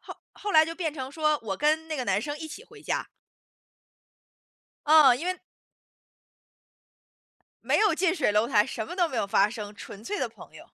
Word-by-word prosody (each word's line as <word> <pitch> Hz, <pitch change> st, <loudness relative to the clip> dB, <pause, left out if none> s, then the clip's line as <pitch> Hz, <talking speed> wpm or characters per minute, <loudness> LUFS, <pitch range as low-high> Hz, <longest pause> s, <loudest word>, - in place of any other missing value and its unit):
后 -, -, -10 dB, 0.2 s
后 410 Hz, -, -5 dB
来 315 Hz, 0 st, +7 dB
就 330 Hz, +1 st, -6 dB
变 325 Hz, -4 st, -3 dB
成 265 Hz, -1 st, -6 dB
说， 305 Hz, -1 st, +1 dB
我 195 Hz, -3 st, -3 dB
跟 315 Hz, +2 st, +1 dB
那 315 Hz, -, -4 dB
个 255 Hz, -4 st, -3 dB
男 195 Hz, 0 st, +1 dB
生 290 Hz, 0 st, -4 dB
一 315 Hz, +1 st, -7 dB
起 460 Hz, -, -10 dB
回 -, -, -16 dB
家。 -, -, -3 dB, 1.8 s
哦， 295 Hz, -4 st, +7 dB
因 295 Hz, +8 st, -5 dB
为 370 Hz, -, 0 dB, 2.3 s
没 -, -, +3 dB
有 420 Hz, -6 st, +3 dB
近 360 Hz, +1 st, +1 dB
水 295 Hz, -, +1 dB
楼 210 Hz, +2 st, +2 dB
台， 215 Hz, -3 st, +3 dB
什 220 Hz, -4 st, -5 dB
么 -, -, -7 dB
都 350 Hz, -3 st, +1 dB
没 255 Hz, -, -6 dB
有 200 Hz, -, 0 dB
发 200 Hz, +1 st, +3 dB
生， 210 Hz, -2 st, -7 dB
纯 205 Hz, +1 st, -11 dB
粹 415 Hz, -, -3 dB
的 -, -, -1 dB
朋 -, -, -15 dB
友。 -, -, -13 dB
300 Hz, 210 characters per minute, -27 LUFS, 225-325 Hz, 2.3 s, 来